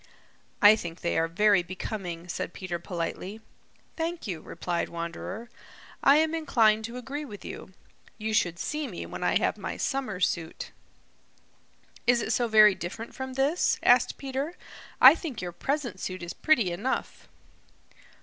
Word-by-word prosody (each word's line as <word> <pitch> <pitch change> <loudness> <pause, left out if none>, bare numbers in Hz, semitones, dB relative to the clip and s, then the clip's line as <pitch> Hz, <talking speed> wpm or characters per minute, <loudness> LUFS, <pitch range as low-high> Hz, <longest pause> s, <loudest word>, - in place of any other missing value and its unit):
"I 205 +1 +10
think 170 -5 -7
they 170 - -1
are 165 - +1
very 200 +3 +4
becoming," 180 -1 -6
said 175 0 -4
Peter 180 -2 -4
politely. 180 +4 -5 0.6
"Thank 330 +1 -3
you," 180 -7 -4
replied 175 -1 -3
Wanderer. 170 +6 -6 0.6
"I 275 - +7
am 315 +1 +3
inclined 220 -9 +3
to 235 +2 -7
agree 275 +4 -5
with 210 -8 -10
you. 190 - -8 0.4
You 220 0 -3
should 175 -5 +1
see 300 - -3
me 185 -8 -6
when - - -6
I - - +3
have - - 0
my - - -4
summer 260 -9 -2
suit." 170 -2 -2 1.4
"Is 245 -1 +5
it - - -1
so 240 - +1
very 215 -2 +7
different 190 +6 -7
from 260 0 -6
this?" 275 +6 +2
asked - - +4
Peter. 275 +5 -4 0.4
"I 260 +3 +11
think 320 -7 -6
your 180 -1 -4
present 260 - -3
suit 185 -1 -5
is 170 - -5
pretty 235 - +2
enough." 210 +10 -3
215 Hz, 155 wpm, -28 LUFS, 175-265 Hz, 1.4 s, I